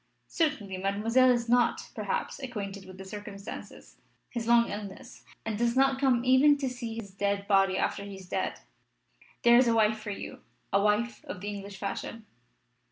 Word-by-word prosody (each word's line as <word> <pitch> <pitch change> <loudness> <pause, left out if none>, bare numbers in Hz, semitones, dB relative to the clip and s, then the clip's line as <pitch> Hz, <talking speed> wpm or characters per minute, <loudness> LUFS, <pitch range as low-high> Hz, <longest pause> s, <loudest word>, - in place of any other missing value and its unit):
"Certainly 285 - -1
Mademoiselle 215 +7 +3
is 240 -1 +2
not, 245 0 +2
perhaps, - - -3
acquainted 200 -6 -5
with 185 0 -11
the 190 - -9
circumstances 200 0 -9 0.3
his 230 -2 -4
long 235 0 +5
illness; 205 +4 -8 0.2
and 220 -1 -2
does 235 0 +1
not 270 0 +3
come 250 -3 +3
even 270 +3 +6
to 275 -2 -2
see 240 -3 -6
his 215 -4 -7
dead 200 0 -1
body 195 -1 +4
after 200 - -1
he 200 -1 -8
is 190 -1 -11
dead. - - -2 0.8
There 235 0 +7
is 250 - +4
a 230 - +3
wife 220 -1 +3
for 215 0 -7
you 200 - -6 0.3
a 200 - +4
wife 210 +3 +1
of - - -6
the 205 +2 -5
English 200 -1 -7
fashion!" 205 +3 -5
215 Hz, 175 wpm, -29 LUFS, 200-240 Hz, 0.8 s, There